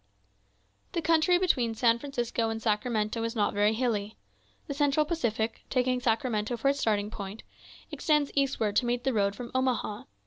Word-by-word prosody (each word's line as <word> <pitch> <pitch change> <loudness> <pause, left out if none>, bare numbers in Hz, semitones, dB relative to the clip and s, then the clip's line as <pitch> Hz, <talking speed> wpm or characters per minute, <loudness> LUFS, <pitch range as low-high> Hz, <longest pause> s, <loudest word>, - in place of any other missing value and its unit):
The 335 - 0
country 330 +2 +4
between 250 -11 +1
San 230 0 +3
Francisco 240 -4 -2
and 225 0 -3
Sacramento 215 0 0
is 230 +1 -2
not 210 -2 +1
very 205 +1 +3
hilly. 220 -3 -1 0.5
The 280 - -4
Central 290 +1 +2
Pacific, 235 -9 -1
taking 255 -1 +1
Sacramento 230 -1 0
for 275 +4 +2
its 280 0 0
starting 210 -3 0
point, 200 0 -7 0.5
extends 300 -2 +1
eastward 265 -7 0
to 245 - +2
meet 245 0 -1
the 265 - +1
road 200 -2 +1
from 240 +2 -7
Omaha. 255 -5 -1
235 Hz, 165 wpm, -28 LUFS, 215-275 Hz, 0.5 s, country